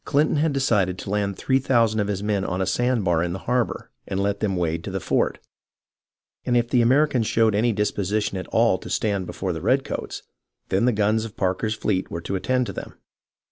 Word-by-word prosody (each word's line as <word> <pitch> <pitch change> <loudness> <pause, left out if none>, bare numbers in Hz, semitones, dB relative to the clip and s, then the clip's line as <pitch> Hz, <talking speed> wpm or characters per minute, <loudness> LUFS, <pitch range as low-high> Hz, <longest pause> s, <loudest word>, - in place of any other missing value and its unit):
CHnton 150 +1 +2
had 155 +1 +2
decided 105 -10 +1
to 95 - -6
land 100 -2 -1
three 130 0 +1
thousand 115 -5 +2
of 100 - 0
his 100 -1 -2
men 105 -2 0
on 90 -1 -2
a 95 - +1
sand 120 +3 0
bar 85 -3 +2
in 85 0 -1
the - - -3
harbour, 125 -1 -1 0.2
and 95 -1 -2
let 100 0 0
them 100 -3 0
wade 85 -2 -1
to - - -5
the - - -3
fort, - - 0 1.1
and 120 - +1
if 120 0 +1
the 125 -1 +3
Americans 130 -1 +3
showed 115 -1 +3
any 115 +4 +2
disposition 105 -1 -1
at 95 - -5
all 115 -4 +2
to - - -9
stand 100 -4 -1
before 95 -2 -3
the 80 - -5
redcoats, 135 +8 -1 0.5
then 95 +5 +2
the 125 - +4
guns 110 0 +1
of 115 -2 -8
Parker's 95 +4 0
fleet 95 -3 -1
were 85 - -5
to 100 - -3
attend 125 +7 0
to - - -6
them. - - -8
105 Hz, 215 wpm, -23 LUFS, 95-120 Hz, 1.1 s, the